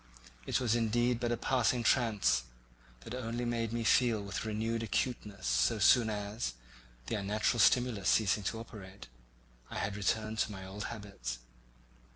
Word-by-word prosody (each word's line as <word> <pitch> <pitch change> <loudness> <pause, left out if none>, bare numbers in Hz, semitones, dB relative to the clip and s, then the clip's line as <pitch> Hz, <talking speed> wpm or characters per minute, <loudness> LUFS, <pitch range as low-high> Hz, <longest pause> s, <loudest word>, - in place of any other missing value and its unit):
It - - +1
was 120 -4 +1
indeed 120 +1 +1
but 120 -1 -1
a 120 - 0
passing 125 -1 +1
trance, 110 - +2 0.6
that 115 - -8
only 120 -1 -3
made 115 -2 -1
me 115 0 -2
feel 115 -1 +3
with 100 -1 -4
renewed 110 +1 -1
acuteness 105 -3 -2
so 115 - +2
soon 110 +3 +5
as, 105 - -3 0.5
the - - -4
unnatural 105 +3 0
stimulus 120 -4 +3
ceasing 105 -1 +3
to 110 - -2
operate, 100 - -10 0.6
I - - -6
had 100 0 -2
returned 110 +2 -1
to 110 - +1
my 95 -2 -8
old 100 +2 -6
habits. 100 - -6
110 Hz, 155 wpm, -32 LUFS, 100-120 Hz, 0.6 s, soon